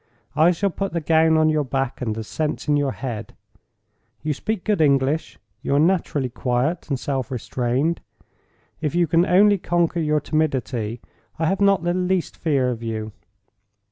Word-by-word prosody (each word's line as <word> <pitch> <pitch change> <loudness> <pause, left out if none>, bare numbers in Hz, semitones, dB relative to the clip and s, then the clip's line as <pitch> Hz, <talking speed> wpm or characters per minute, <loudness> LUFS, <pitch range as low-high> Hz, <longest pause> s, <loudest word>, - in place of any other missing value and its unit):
I 160 +3 +5
shall 190 +3 0
put 195 +1 -3
the 170 - 0
gown 160 0 +3
on 155 0 +4
your 155 -1 +1
back, 135 -1 -2
and 110 -4 -2
the 110 - -4
sense 150 +7 -3
in 150 - +3
your 145 -2 +1
head. 115 -5 -6 0.9
You 155 0 0
speak 215 +6 -3
good 210 -6 +1
English; 140 -4 +1 0.2
you 140 - 0
are - - +4
naturally 160 -5 +1
quiet 125 +9 -1
and 135 -3 -1
self 135 -2 -2
restrained; 130 +5 -1 0.8
if 155 0 -1
you 175 0 +4
can 165 +3 +2
only 200 +2 +5
conquer 175 0 0
your 150 -1 +1
timidity, 130 -7 -1 0.4
I 160 - 0
have 190 +5 0
not 195 -3 +4
the 175 0 +1
least 185 -1 -1
fear 135 -6 +1
of 115 -2 -5
you. 110 -1 -4
150 Hz, 170 wpm, -22 LUFS, 130-170 Hz, 0.9 s, I